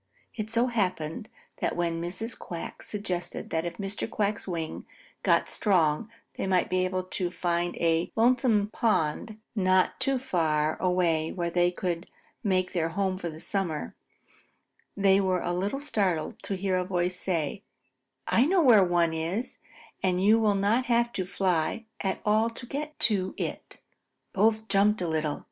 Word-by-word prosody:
So 230 +2 +2
it - - -4
happened 185 -2 -2 0.3
that - - -1
when 170 -1 -1
Mrs. 185 +7 -3
Quack 170 -1 -7
suggested 185 -4 -4
that 160 +1 0
if 170 0 -5
Mr. 200 +2 -4
Quack's 210 -2 -1
wing 165 -3 -4 0.3
got - - +3
strong 180 -1 +1 0.2
they - - -3
might 185 -2 +2
be 185 0 +2
able 185 0 -1
to 180 -1 -2
find 175 -1 -1
a 165 0 +1
lonesome 230 -3 +3
pond 215 0 0 0.2
not 185 -2 +2
too 270 0 +2
far 155 -10 0
away 175 -3 +1
where 170 -2 -2
they 175 0 +3
could 175 -1 -3 0.4
make 185 -3 +1
their 165 -3 0
home 190 +1 -1
for 175 - -3
the 155 0 -9
summer, 175 -5 -2 1.0
they 195 0 +4
were 185 -2 0
a 175 - -1
little 200 +9 -1
startled 195 - -1
to 195 - -3
hear 190 0 0
a 180 - 0
voice 180 -1 -1
say: 170 0 -2 0.6
"I 250 +5 +3
know 365 0 +3
where 245 -6 +7
there 175 -3 +3
is 170 +10 -3
one, - - -30 0.3
and 180 -1 +1
you 215 +3 +6
will 210 -2 +3
not 210 +6 +2
have 235 0 +2
to 185 - -2
fly 185 +2 0
at 190 -2 -1
all 215 +2 +3
to 230 +2 -9
get 300 +4 -5
to 195 -4 +2
it." - - -5 0.6
Both 220 +2 +2
jumped 205 +1 +3
a 180 - -1
little. 155 -2 -1
185 Hz, 165 wpm, -28 LUFS, 175-215 Hz, 1.0 s, where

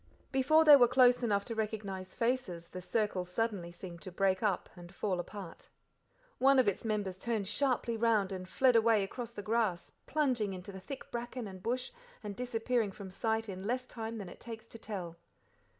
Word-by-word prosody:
Before 310 +4 +4
they 300 -2 +11
were 245 -3 +7
close 250 0 +5
enough 200 -4 +1
to 230 - -4
recognize 205 -4 -4
faces 230 -9 -1
the 185 - -7
circle 205 -1 0
suddenly 180 -1 -2
seemed 170 -1 -9
to 185 - -7
break 190 +1 +1
up 205 -5 0
and 175 -1 -11
fall 195 -2 -1
apart. 185 -1 -8 0.7
One 270 +1 +6
of 255 -4 +5
its 200 - 0
members 205 -4 -2
turned 220 -4 -1
sharply 235 +1 +1
round 220 -4 +2
and 185 -1 -6
fled 260 -2 +4
away 225 -2 +5
across 235 +4 -5
the 205 -3 -8
grass, 215 -6 0 0.2
plunging 255 -9 +1
into 185 +2 -8
the 190 - -8
thick 270 +7 -8
bracken 240 0 -4
and 190 -1 -9
bush, 250 +5 -2 0.3
and 205 -1 -5
disappearing 235 -2 0
from 190 -1 -9
sight 225 +3 -1
in 190 0 -5
less 250 +2 -1
time 225 -2 -6
than 200 -4 -6
it - - -11
takes 225 -2 -8
to 230 - -10
tell. 180 -7 -6
220 Hz, 190 wpm, -33 LUFS, 190-240 Hz, 0.7 s, they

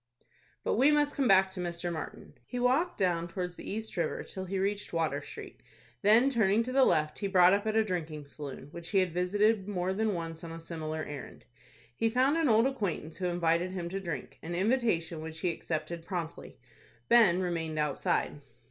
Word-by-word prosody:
But - - 0
we 265 +5 +6
must 295 -1 +3
come 275 -3 +1
back 190 -2 +5
to 190 - -6
Mr. 175 0 -2
Martin. 160 - -7
He 250 - -5
walked 265 +8 +2
down 175 -3 +1
towards 180 0 -4
the - - -8
East 220 +2 -4
River 170 -3 -1
till 190 -1 -6
he 195 +1 -3
reached 200 +1 -2
Water 155 -4 0
Street, 145 - -10 0.4
then 225 +6 +6
turning 225 -4 +3
to 255 - -4
the 265 0 +5
left, 155 0 +1
he 200 - -1
brought 185 -1 +6
up 205 +2 0
at 215 - 0
a 220 - +5
drinking 160 -7 -4
saloon, 140 0 -8
which 170 0 -7
he 200 - +1
had 185 -3 +2
visited 200 +3 +2
more 185 -1 -1
than 215 0 0
once 165 -1 -5
on 165 - -7
a 165 - -7
similar 160 -1 -4
errand. 145 -3 -8 0.5
He 225 - +1
found 260 +5 +3
an 325 -4 +2
old 225 +1 +5
acquaintance 200 - -2
who 180 0 -1
invited 175 +1 +1
him 175 -2 -4
to 195 +2 -3
drink,—an 165 -1 -6
invitation 185 -6 +1
which 160 0 -7
he 180 - +1
accepted 165 +1 -4
promptly. 170 -2 -5 0.5
Ben 215 -7 +6
remained 165 -4 -2
outside. 150 0 0
180 Hz, 195 wpm, -30 LUFS, 165-215 Hz, 0.5 s, we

